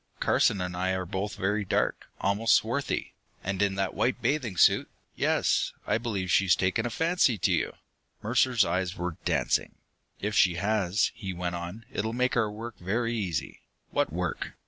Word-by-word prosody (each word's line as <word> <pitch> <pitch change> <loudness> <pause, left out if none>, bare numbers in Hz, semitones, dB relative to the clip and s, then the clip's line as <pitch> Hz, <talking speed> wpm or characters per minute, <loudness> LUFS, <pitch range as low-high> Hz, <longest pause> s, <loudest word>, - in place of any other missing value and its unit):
Carson 100 - +2
and 90 -1 -3
I 95 +1 0
are 95 0 -3
both 100 +2 -3
very 105 +1 0
dark, 95 - -1
almost 105 +3 +3
swarthy. 125 +6 -1 0.3
And 95 +1 -2
in 100 -1 +2
that 95 -1 -1
white 130 - 0
bathing 125 - -1
suit - - +5 0.3
yes, - - +1
I - - +1
believe 100 -6 -2
she's 95 -1 +5
taken 95 +5 0
a - - -3
fancy 160 -2 +2
to 85 - +1
you!" - - 0 0.5
Mercer's 120 0 +3
eyes 90 -1 -1
were 90 -1 -3
dancing. - - +1 0.4
"If 105 +1 -2
she 90 -4 +4
has," 100 +1 +1
he 95 -2 -5
went 90 0 -3
on, 90 +6 -6
"it'll 110 +2 -2
make 125 +1 +1
our 110 -3 +2
work 115 +1 -8
very 115 +6 -1
easy." 95 -8 -3 0.3
"What - - +1
work?" - - -3
100 Hz, 170 wpm, -28 LUFS, 95-115 Hz, 0.5 s, suit